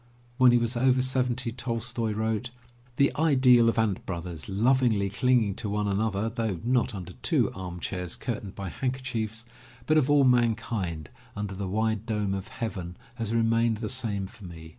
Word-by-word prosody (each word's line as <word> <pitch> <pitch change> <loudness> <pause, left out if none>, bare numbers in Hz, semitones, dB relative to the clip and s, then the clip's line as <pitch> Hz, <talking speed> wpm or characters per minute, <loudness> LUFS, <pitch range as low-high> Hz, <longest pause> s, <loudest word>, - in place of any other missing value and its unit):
When 130 -1 +7
he 120 - +5
was 120 +1 0
over 130 +1 +3
seventy 130 -1 0
Tolstoy 115 -1 -2
wrote, 110 +2 -1 0.5
*The 140 +2 +3
ideal 130 -6 +5
of 115 - -2
*ant 110 -4 +1
brothers', 85 -2 -5
lovingly 110 -1 +2
cling 125 +2 +3
ing 100 -2 -2
to 110 - -3
one 105 0 -1
another, 100 +1 0
though 110 -5 -2
not 125 -1 +1
under 90 -3 -7
two - - +2
arm 90 -1 -6
chairs 90 -1 -3
curtained 105 -5 -5
by 100 -2 -5
handkerchiefs, 120 -3 -3 0.4
but 155 0 +4
of 140 -1 0
all 145 -1 +5
mankind 115 - +1 0.2
under 105 -1 -4
the 95 -1 -4
wide 110 +2 -1
dome 105 -3 -1
of 95 +2 -4
heaven, 95 -7 -5 0.2
has 115 -3 -3
remained 115 0 +2
the 110 -1 -4
same 110 -6 -2
for 100 - -13
me. 80 -3 -10
110 Hz, 175 wpm, -27 LUFS, 100-125 Hz, 0.5 s, When